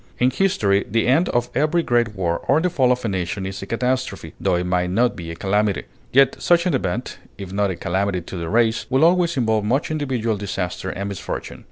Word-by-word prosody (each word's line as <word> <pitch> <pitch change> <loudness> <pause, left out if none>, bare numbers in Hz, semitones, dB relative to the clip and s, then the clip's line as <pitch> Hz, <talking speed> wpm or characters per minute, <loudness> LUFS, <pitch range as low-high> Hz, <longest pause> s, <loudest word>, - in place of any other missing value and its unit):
In 125 +1 +3
history, 110 - +2
the 115 +2 +1
end 150 +9 +3
of 120 0 0
every 155 +5 +2
great 120 -5 +1
war 85 -3 -1
or 140 - +4
the 180 +2 0
fall 130 -6 +3
of 125 -1 -1
a - - +1
nation 95 0 -2
is 95 0 -5
a 100 - -7
catastrophe, 125 +3 -2
tho - - +2
it 90 - 0
may 90 0 0
not 120 +7 +1
be 85 -2 -7
a 85 - -5
calamity. 100 +3 0 0.3
Yet 135 0 +4
such 175 0 +3
an 180 - +1
event, 120 -1 -2 0.2
if 95 -2 -8
not 100 0 +1
a 95 - -2
calamity 95 +2 -1
to 90 - -8
the 85 -1 -4
race, 115 0 +2
will 135 +4 +4
always 170 -2 +3
involve 110 -4 +1
much 130 +9 0
individual 130 -8 -1
disaster 95 -2 -4
and 100 +2 -4
misfortune. 100 - -6
110 Hz, 220 wpm, -21 LUFS, 95-130 Hz, 0.3 s, or